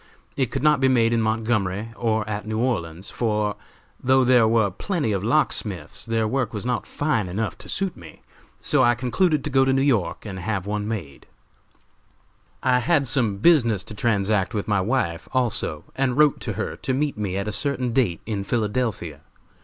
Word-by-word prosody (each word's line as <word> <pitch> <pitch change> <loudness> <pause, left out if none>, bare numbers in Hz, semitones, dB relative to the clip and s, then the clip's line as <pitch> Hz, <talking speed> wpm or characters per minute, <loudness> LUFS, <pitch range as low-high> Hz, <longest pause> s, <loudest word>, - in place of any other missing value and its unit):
It 130 -4 0
could 135 - -3
not 150 -2 +4
be 130 - +3
made 120 -3 +3
in 115 - +2
Montgomery 110 -2 -1
or 110 -3 0
at 105 0 -4
New 110 0 -2
Orleans, 95 -7 -2
for, 105 -3 0 0.5
though 130 +1 +4
there 125 -3 +5
were 110 -3 +2
plenty 160 - -2
of 100 -2 -1
locksmiths, 110 - -1
their 115 -1 +1
work 125 -2 -1
was 105 - -3
not 125 -2 -1
fine 145 -10 -1
enough 105 +5 -3
to - - -10
suit 195 -2 -2
me; 80 -3 -14 0.4
so 150 -3 +2
I 120 0 +4
concluded 145 +6 +1
to 150 - -4
go 135 0 +4
to 135 - +2
New 135 0 +2
York 115 -12 0
and 95 -3 -6
have 95 0 -2
one 105 0 -2
made. 95 -11 -6 1.4
"I 125 -1 +3
had 140 +3 +2
some 120 -6 +1
business 115 - +4
to 105 - -9
transact 105 -3 0
with 105 - -2
my 105 -3 +2
wife 95 -7 -1
also, 120 - 0
and 130 -1 0
wrote 150 -2 +4
to - - -3
her - - -3
to 130 - -2
meet 145 +1 0
me 100 -3 -3
at 100 +1 -3
a - - -1
certain 125 +1 -1
date 115 -10 +1
in 105 -3 -3
Philadelphia. 105 - -2
115 Hz, 190 wpm, -23 LUFS, 105-130 Hz, 1.4 s, there